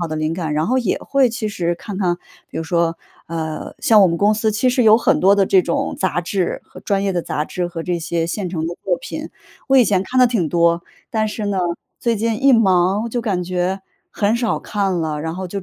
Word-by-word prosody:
好 - - 0
的 155 - -4
灵 155 +1 -1
感。 165 -4 -3
然 155 +1 0
后 255 - +1
也 230 -7 0
会 275 -3 +2
其 220 -1 -3
实 175 -4 -1
看 195 +3 -8
看， 180 -3 +1 0.3
比 - - -9
如 - - -2
说， 170 0 0 0.3
呃， 160 -1 -5
像 220 -2 +5
我 195 - +7
们 170 - 0
公 205 +4 +3
司 220 0 0
其 235 +5 +1
实 250 0 +2
有 220 -1 +7
很 - - +2
多 195 +2 +5
的 200 - +3
这 190 - +5
种 170 - -2
杂 185 -2 0
志 180 +1 -2
和 - - -14
专 200 -1 0
业 200 - 0
的 175 - 0
杂 150 - -2
志 180 -1 -3
和 170 -1 -6
这 175 0 -2
些 165 0 -2
现 185 +2 -3
成 165 -3 -2
的 170 - -4
作 180 -2 +1
品， - - -6 0.4
我 270 - +5
以 245 - +6
前 190 -2 +2
看 255 +6 -2
得 250 - +7
挺 225 -9 0
多。 170 +1 +2 0.3
但 220 -1 0
是 210 0 -4
呢， 200 -2 -1 0.4
最 235 -1 0
近 225 +2 -1
一 275 -1 +6
忙 195 0 +3
就 240 - -1
感 195 -6 -1
觉 185 +2 -2 0.3
很 210 +2 +1
少 235 -2 0
看 200 -3 -1
了。 160 -3 -2
然 160 +2 -4
后 185 0 -5
就 195 +1 -5
190 Hz, 265 characters per minute, -19 LUFS, 170-215 Hz, 0.4 s, 我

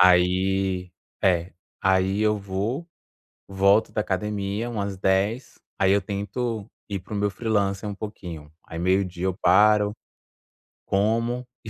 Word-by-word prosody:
Aí 90 +1 +3 0.3
é. 90 -2 +2 0.3
Aí 95 +1 +2
eu 105 0 +2
vou, 100 - -3 0.6
volto 100 +2 +3
da 105 - +1
academia 105 +3 -2
umas 100 -4 -3
10h, 100 +6 0 0.2
aí 95 0 +3
eu 100 - +3
tento 105 +3 -3 0.2
ir 100 -1 -2
para 95 +4 -10
o - - -1
meu 105 0 +1
freelancer 100 -1 -1
um 100 - -4
pouquinho. 90 -8 -8
Aí 80 - -8
meio 95 +3 +2
dia 90 0 -5
eu 95 - +1
paro, 105 +3 +5 0.9
como, 115 +5 +1 0.2
e - - -6
100 Hz, 140 wpm, -25 LUFS, 95-105 Hz, 0.9 s, paro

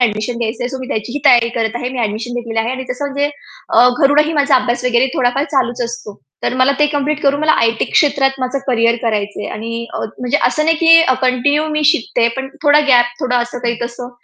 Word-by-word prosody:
Admission 225 0 -1
घ्यायचंय. 235 +1 -3
So 265 0 -6
मी 260 - -6
त्याचीही 235 +3 -4
तयारी 240 -3 +5
करत 225 -1 -2
आहे. 245 +1 -3
मी 260 - -6
ॲडमिशन 225 +2 -3
घेतलेली 230 -2 -4
आहे. 225 +2 0
आणि 260 0 -5
तसं 250 +3 -4
म्हणजे 285 +1 -2 0.4
अ, 250 - +5
घरूनही 300 +2 +3
माझा 285 -2 +2
अभ्यास 245 0 -1
वगैरे 250 +1 +2
थोडाफार 260 +2 0
चालूच 260 -5 -1
असतो. 235 - -8 0.2
तर - - -1
मला 255 +2 +3
ते 295 - +4
कंप्लीट 290 0 -2
करून 285 0 +1
मला 310 0 +3
आय-टी 230 0 +1
क्षेत्रात 275 -2 +2
माझं 255 +1 -2
करियर 235 -2 +2
करायचंय 210 -2 -2
आणि 230 +1 -5
अ, - - -3 0.2
म्हणजे 250 +3 0
असं 305 - -1
नाही 325 +1 +2
की 330 0 +6 0.2
कंटिन्यू 285 +4 +1
मी 305 0 -1
शिकतेय 245 -5 +2
पण 265 0 -4
थोडा 295 0 +5
गॅप, 245 -2 +5
थोडा 250 -2 0
असं, 240 +1 -4
काही 240 -1 -2
तसं 240 +1 -6
250 Hz, 210 wpm, -16 LUFS, 235-285 Hz, 0.4 s, की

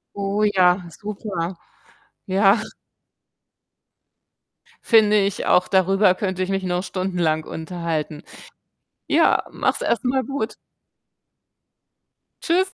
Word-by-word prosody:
Oh 200 +1 -1
ja, 180 -3 +3
super. 190 -2 -5 0.7
Ja. 195 +3 +4 2.3
Finde 215 -2 +5
ich 200 -1 0
auch, 180 - +3
darüber 195 0 +3
könnte 185 -1 -2
ich 185 - -4
mich 195 0 -1
noch 180 0 -1
stundenlang 175 -5 -1
unterhalten. 160 -2 -4 0.9
Ja, - - +3
mach's - - -1
erst 235 - -1
mal 260 +1 +1
gut. 275 -5 -4 1.9
Tschüss. 340 +2 +2
190 Hz, 95 wpm, -22 LUFS, 180-210 Hz, 2.3 s, Finde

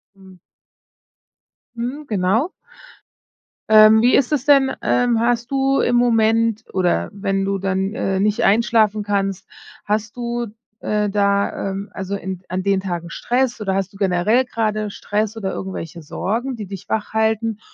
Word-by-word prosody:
Mhm. 190 -2 -17 1.4
Mhm, 255 +6 -4
genau. 210 - +1 1.2
Ähm, 215 0 +7
wie 245 - +4
ist 275 +1 +2
es 280 -3 0
denn, 275 -2 +5
ähm, 245 -2 +2
hast 235 +1 0
du 270 0 +2
im 245 - +2
Moment 225 -2 +2
oder 175 - +1
wenn 195 -1 -2
du 195 0 -1
dann, 195 +1 -1
äh, 190 -4 -1
nicht 210 0 +1
einschlafen 215 0 +3
kannst, 195 -2 -1 0.4
hast 210 +1 -2
du, 240 0 -3 0.3
äh, 210 -1 -1
da, 200 -1 0
ähm, 195 +1 -6
also, 190 +1 -4
in 190 -2 -6
an 185 +1 -3
den 195 0 +2
Tagen 175 -3 -4
Stress 245 +4 -1
oder 195 -2 -1
hast 195 -1 -2
du 195 - -15
generell 195 +6 +2
grade 215 -3 -2
Stress 210 +2 -2
oder 200 -4 -3
irgendwelche 170 -3 -6
Sorgen, 230 - -3
die 215 -3 -6
dich 195 0 -9
wachhalten? 220 0 -1
210 Hz, 150 wpm, -20 LUFS, 195-235 Hz, 1.4 s, Ähm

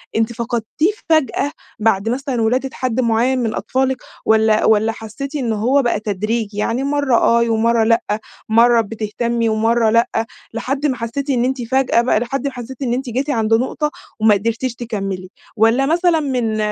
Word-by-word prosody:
أنتِ 225 +1 +1
فقدتيه 235 - -1 0.2
فجأة 300 -2 +2 0.3
بعد 215 -1 +1
مثلًا، 255 0 -2
ولادة 250 +4 +1
حد 255 -1 -2
معيّن 240 +2 +2
من 230 -3 -1
أطفالِك، 265 0 0 0.3
والّا 220 -1 +3
والّا 220 +1 +3
حسيتِ 225 +7 -7
إن 245 -6 -1
هو 250 +7 +2
بقى 240 -4 0
تدريجي، 215 +1 -2
يعني 230 +5 -1
مرّة 285 -2 +1
آه، 235 0 +3
ومرّة 225 +1 +2
لأ، 230 +1 +3 0.5
مرّة 230 +1 +5
بتهتمي 225 +2 -2
ومرّة 225 +1 +2
لأ، 230 +2 +3 0.5
لحد 270 +5 -2
ما 270 -3 +1
حسيتِ 245 +5 -4
إن 245 -3 +2
أنتِ 260 0 -1
فجأة 250 0 +2
بقى 235 -3 +2
لحد 245 +3 -3
ما 275 - -4
حسيتِ 250 +1 -9
إن 240 -3 0
أنتِ 260 0 -3
جيتِ 260 +5 -2
عند 225 -4 +1
نقطة 260 +6 0 0.3
وما 215 0 +5
قدِرتيش 230 +4 -2
تكمّلي؟ 195 -6 -4 0.3
والّا 225 +5 +3
مثلًا 335 +2 +2
من 250 -7 -1
235 Hz, 170 wpm, -18 LUFS, 220-265 Hz, 0.5 s, مرّة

